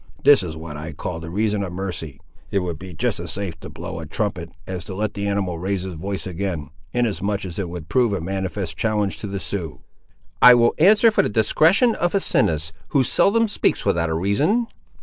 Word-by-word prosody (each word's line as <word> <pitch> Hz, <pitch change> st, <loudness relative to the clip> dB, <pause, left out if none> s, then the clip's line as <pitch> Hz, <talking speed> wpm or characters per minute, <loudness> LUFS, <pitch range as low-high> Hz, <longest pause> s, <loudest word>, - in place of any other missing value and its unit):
This 145 Hz, -4 st, +7 dB
is 80 Hz, -4 st, -5 dB
what 80 Hz, -2 st, -7 dB
I 80 Hz, +2 st, -6 dB
call 80 Hz, +3 st, -5 dB
the 85 Hz, 0 st, -7 dB
reason 105 Hz, +3 st, 0 dB
of 95 Hz, -3 st, -3 dB
mercy. 90 Hz, -7 st, -5 dB, 0.3 s
It 100 Hz, -, 0 dB
would 85 Hz, -3 st, -4 dB
be 95 Hz, 0 st, -9 dB
just 80 Hz, -, -1 dB
as -, -, -5 dB
safe 95 Hz, -5 st, -4 dB
to -, -, -9 dB
blow 85 Hz, +1 st, -7 dB
a 80 Hz, -, -7 dB
trumpet, 90 Hz, -1 st, -3 dB, 0.2 s
as 90 Hz, -2 st, -5 dB
to 95 Hz, -, -6 dB
let 105 Hz, +1 st, -2 dB
the 100 Hz, 0 st, -3 dB
animal 95 Hz, -4 st, -1 dB
raise 95 Hz, +1 st, -2 dB
his 95 Hz, -1 st, -5 dB
voice 95 Hz, +4 st, -4 dB
again, 90 Hz, -6 st, -4 dB, 0.2 s
inasmuch 100 Hz, -4 st, -1 dB
as 90 Hz, +1 st, -6 dB
it 95 Hz, -3 st, -2 dB
would 85 Hz, -2 st, -7 dB
prove 125 Hz, 0 st, +2 dB
a 100 Hz, -, -1 dB
manifest 95 Hz, -1 st, -3 dB
challenge 105 Hz, +1 st, 0 dB
to 105 Hz, -, -4 dB
the 100 Hz, 0 st, -4 dB
Siouxes." 85 Hz, -9 st, -4 dB, 0.6 s
"I 125 Hz, 0 st, +10 dB
will 120 Hz, -1 st, +4 dB
answer 215 Hz, +7 st, +6 dB
for -, -, +3 dB
the -, -, -1 dB
discretion 160 Hz, -, +4 dB
of 175 Hz, 0 st, -1 dB
Asinus, 80 Hz, -, +1 dB, 0.2 s
who 135 Hz, -, +2 dB
seldom 205 Hz, -, +3 dB
speaks 205 Hz, -, 0 dB
without 85 Hz, -1 st, +1 dB
a 80 Hz, -, -1 dB
reason." 140 Hz, -, +1 dB
95 Hz, 210 wpm, -22 LUFS, 85-110 Hz, 0.6 s, I